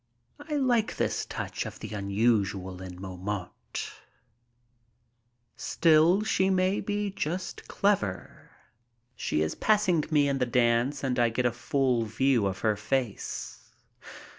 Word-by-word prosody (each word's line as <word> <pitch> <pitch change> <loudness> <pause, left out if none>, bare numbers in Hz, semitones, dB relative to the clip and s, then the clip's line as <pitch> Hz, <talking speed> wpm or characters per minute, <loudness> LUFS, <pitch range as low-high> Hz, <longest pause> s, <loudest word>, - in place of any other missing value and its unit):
I 300 +1 -4
like 245 -6 +1
this - - -1
touch - - -4
of - - -9
the - - -8
unusual 100 -2 0
in 90 -1 -8
Montmartre. 95 0 -5 1.6
Still 165 +4 +4
she 190 -3 +2
may 185 +1 +2
be 205 -1 -2
just 180 0 -4
clever. 180 - -1 0.7
She 75 - 0
is 80 - -1
passing 205 -7 +2
me 145 -2 +3
in 140 -1 0
the 125 - +1
dance 120 +3 +2
and 125 -2 0
I 120 -1 +4
get 125 +2 -1
a 125 - +3
full 125 -1 0
view 115 0 +2
of 95 -1 -4
her 110 -2 +2
face. 115 +2 -3
125 Hz, 130 wpm, -28 LUFS, -, 1.6 s, Still